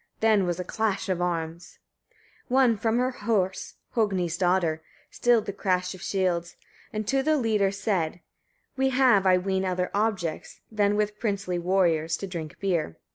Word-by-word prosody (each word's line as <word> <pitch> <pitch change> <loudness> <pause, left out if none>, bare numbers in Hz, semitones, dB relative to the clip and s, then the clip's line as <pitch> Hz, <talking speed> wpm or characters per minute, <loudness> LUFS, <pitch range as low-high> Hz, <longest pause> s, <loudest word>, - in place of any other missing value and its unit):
then 215 -4 +3
was 175 0 -2
a - - -2
clash 210 +1 -1
of 180 -2 0
arms! 170 -1 -3 0.7
17. 250 - 0
One 255 -4 +5
from 225 +2 0
her 250 +1 +1
horse, 205 -6 -1 0.2
Hogni's 190 -7 0
daughter, 175 -3 +1 0.3
stilled 240 -3 +2
the 200 - -4
crash 180 -2 -1
of 185 - -12
shields, 180 -3 -1 0.4
and 215 -1 -4
to 270 0 +2
the 310 +2 +2
leader 215 -6 +2
said: 190 -5 -1 0.6
"We 265 0 +2
have, 250 -7 +4
I 185 -1 +6
ween, 190 +1 -1
other 180 -1 -1
objects 200 -6 -2
than 205 -1 +2
with 210 0 -1
princely 195 -5 -1
warriors 170 -3 +1
to - - -5
drink 170 -5 -7
beer. 170 - -1
195 Hz, 165 wpm, -26 LUFS, 180-215 Hz, 0.7 s, I